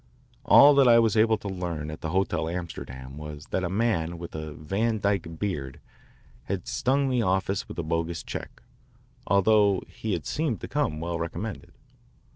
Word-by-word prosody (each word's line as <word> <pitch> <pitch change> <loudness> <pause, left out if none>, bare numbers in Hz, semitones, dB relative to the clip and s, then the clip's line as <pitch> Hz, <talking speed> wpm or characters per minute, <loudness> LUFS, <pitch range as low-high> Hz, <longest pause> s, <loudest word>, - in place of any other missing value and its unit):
All 145 +1 +8
that 140 -2 +5
I 120 -1 +7
was 115 -1 +3
able 110 0 +4
to 105 - -8
learn 85 -5 -4
at 75 - -9
the 80 - -3
Hotel 95 -2 0
Amsterdam 70 -6 -6
was 75 0 -8
that 95 - 0
a 85 - -1
man 90 -5 0
with 85 0 -8
a 80 -1 -5
Van 105 +10 -1
Dyke 95 -5 -1
beard 70 -11 -3 0.7
had - - -4
stung 135 +2 +1
the 125 -2 +2
office 95 -1 0
with - - -9
a 85 - -2
bogus 85 +1 -2
check, - - -7 0.6
although 100 0 +4
he 110 -2 -4
had 80 -6 -3
seemed 140 - -1
to - - -5
come 75 - -1
well 85 0 -3
recommended. 85 +6 -5
90 Hz, 175 wpm, -26 LUFS, 80-110 Hz, 0.7 s, All